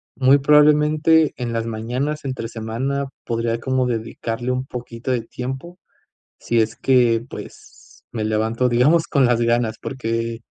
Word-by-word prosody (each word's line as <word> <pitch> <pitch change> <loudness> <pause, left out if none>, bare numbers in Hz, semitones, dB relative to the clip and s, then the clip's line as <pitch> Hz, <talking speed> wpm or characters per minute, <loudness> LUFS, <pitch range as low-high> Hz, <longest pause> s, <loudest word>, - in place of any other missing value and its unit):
muy 135 +1 +5
probablemente 150 +2 +4
en 120 -2 -3
las 115 0 -1
mañanas 125 +7 -3
entre 130 -4 -4
semana 125 +5 -3 0.2
podría 115 0 -1
como 130 0 0
dedicarle 115 +1 -3
un 130 +1 -2
poquito 120 -1 -7
de 125 -2 0
tiempo 135 +10 -7 0.6
si 120 -1 0
es 110 +1 -1
que, 120 -3 +3
pues - - -12
me 110 -2 -3
levanto, 110 +3 0
digamos, 145 +8 +3
con 140 -4 +3
las 120 -1 +2
ganas, 115 -1 +1
porque 115 -2 -3
125 Hz, 145 wpm, -21 LUFS, 115-135 Hz, 0.6 s, muy